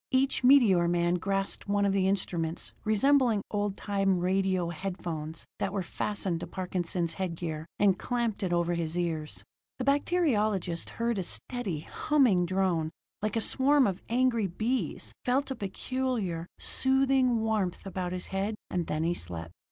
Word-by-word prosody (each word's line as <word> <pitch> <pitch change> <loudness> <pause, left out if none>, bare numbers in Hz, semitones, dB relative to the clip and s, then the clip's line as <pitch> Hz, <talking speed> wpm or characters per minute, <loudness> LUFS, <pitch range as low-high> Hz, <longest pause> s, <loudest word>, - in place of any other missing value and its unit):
Each 265 0 +2
meteor 230 -10 +6
man 175 0 +2
grasped 195 +3 -2
one 200 0 +2
of 195 - +2
the 190 -1 +2
instruments 175 -4 -2
resembling 230 0 +3
old 205 -1 -1
time 195 -2 +1
radio 185 -1 +1
head 180 +3 -4
phones 160 -2 -5
that 195 - -1
were 195 -1 -1
fastened 190 -1 -2
to - - -6
Parkinson's 180 -2 -2
head 185 -2 -3
gear, 160 -2 -4
and 195 -2 +3
clamped 235 -4 -1
it 185 -3 -1
over 170 0 +1
his 170 0 -2
ears. 160 -3 -3 0.3
The 255 - -3
bacteriologist 215 - +1
heard 230 -2 0
a - - -1
steady, 170 - -4
humming 225 - +2
drone, 180 -4 +1 0.3
like 215 0 -1
a 225 - +1
swarm 275 +3 +4
of 190 -3 -1
angry 235 -3 +2
bees 225 +8 -2
felt 265 +2 +1
a - - -1
peculiar, 205 -4 -2
soothing 265 -2 +2
warmth 215 -6 -1
about 185 -2 -3
his 180 0 -2
head; 195 +3 -2 0.2
and 175 -2 -1
then 155 +1 -1
he 170 +1 +2
slept. 85 - -6
195 Hz, 160 wpm, -29 LUFS, 175-235 Hz, 0.3 s, meteor